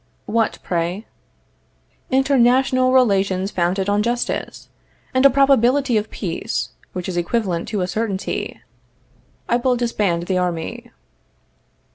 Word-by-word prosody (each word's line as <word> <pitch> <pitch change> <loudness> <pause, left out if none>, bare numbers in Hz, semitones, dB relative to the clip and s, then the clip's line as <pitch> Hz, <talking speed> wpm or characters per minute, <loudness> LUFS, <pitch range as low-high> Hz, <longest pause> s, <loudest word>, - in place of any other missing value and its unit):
What, 225 0 0
pray? 175 +4 -2 1.0
International 255 -1 +3
relations 195 -6 +2
founded 185 +2 0
on 205 +1 +2
justice, 240 +2 -3 0.5
and 260 0 +2
a - - +3
probability 270 -1 +3
of 215 0 0
peace 200 +4 -3 0.2
which 180 -1 -5
is 180 -2 -3
equivalent 175 -1 -1
to 210 -3 -2
a 180 - -1
certainty. 200 -1 -3 0.9
I 240 - +2
will 250 +1 +1
disband 210 -8 0
the 185 +1 0
army. 175 -3 -3
215 Hz, 115 wpm, -20 LUFS, 185-250 Hz, 1.0 s, International